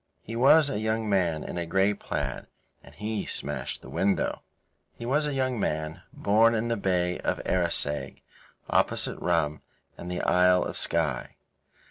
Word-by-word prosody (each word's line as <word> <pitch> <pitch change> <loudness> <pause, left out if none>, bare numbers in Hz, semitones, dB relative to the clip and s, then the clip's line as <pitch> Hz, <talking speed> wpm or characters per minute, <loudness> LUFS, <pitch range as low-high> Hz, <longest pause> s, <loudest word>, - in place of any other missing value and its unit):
He 115 - -7
was 140 +5 +6
a 135 -7 -2
young 110 0 -1
man 90 -6 +1
in 90 - -5
a 85 - -3
grey 95 +4 +2
plaid, - - -4 0.4
and - - -16
he 105 0 -3
smashed 75 +1 -3
the - - -10
window. 100 0 0 0.6
He 115 - -7
was 150 +5 +1
a 145 - -2
young 130 -3 0
man, 80 -3 -2
born 115 +3 +3
in 115 +2 -1
the 115 - +1
Bay 90 -3 0
of - - -1
Arisaig, 85 -5 -1 0.4
opposite - - 0
Rum 80 -4 0 0.4
and 85 - -6
the 90 0 -2
Isle 90 0 +4
of - - -4
Skye. - - 0
100 Hz, 160 wpm, -27 LUFS, 85-115 Hz, 0.6 s, was